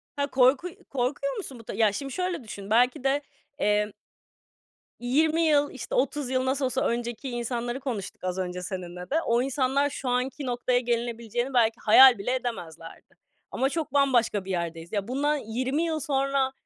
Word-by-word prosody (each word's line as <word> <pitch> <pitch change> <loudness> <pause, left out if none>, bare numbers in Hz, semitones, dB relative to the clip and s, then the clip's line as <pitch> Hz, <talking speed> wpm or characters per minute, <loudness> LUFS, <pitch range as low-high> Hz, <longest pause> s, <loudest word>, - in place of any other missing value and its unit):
Ha, 285 0 0
korku 260 +6 +3 0.2
korkuyor 275 +1 -1
musun 270 - -7
bu 225 - -15
da? - - -4
Ya 215 0 +3
şimdi 275 +4 -5
şöyle 360 -5 -2
düşün, 200 -2 -9
belki 245 +3 +3
de 275 +2 +2 0.4
emm 210 -3 +1 1.1
20 310 +7 +2
yıl, 295 -3 +3
işte 265 - -6
30 270 +1 0
yıl 255 0 0
nasıl 265 +1 0
olsa 260 +1 -1
önceki 240 +2 -3
insanları 240 +1 -3
konuştuk 230 -11 -5
az 185 0 -2
önce 180 -1 -3
seninle 180 -1 -6
de. 320 +4 +1
O 235 +1 +2
insanlar 270 +1 +1
şu 275 -2 -4
anki 255 +3 -1
noktaya 245 0 +1
gelinebileceğini 240 +1 -2
belki 230 -1 +3
hayal 250 +2 +9
bile 245 +6 -1
edemezlerdi. 170 -10 -7 0.4
Ama 265 +1 +1
çok 310 -3 -3
bambaşka 240 -8 +2
bir 195 - -4
yerdeyiz. 170 -1 -4
Ya 205 -1 -2
bundan 290 +4 +1
20 260 +5 -2
yıl 320 -2 -1
sonra 275 -1 0
250 Hz, 170 wpm, -27 LUFS, 225-275 Hz, 1.1 s, hayal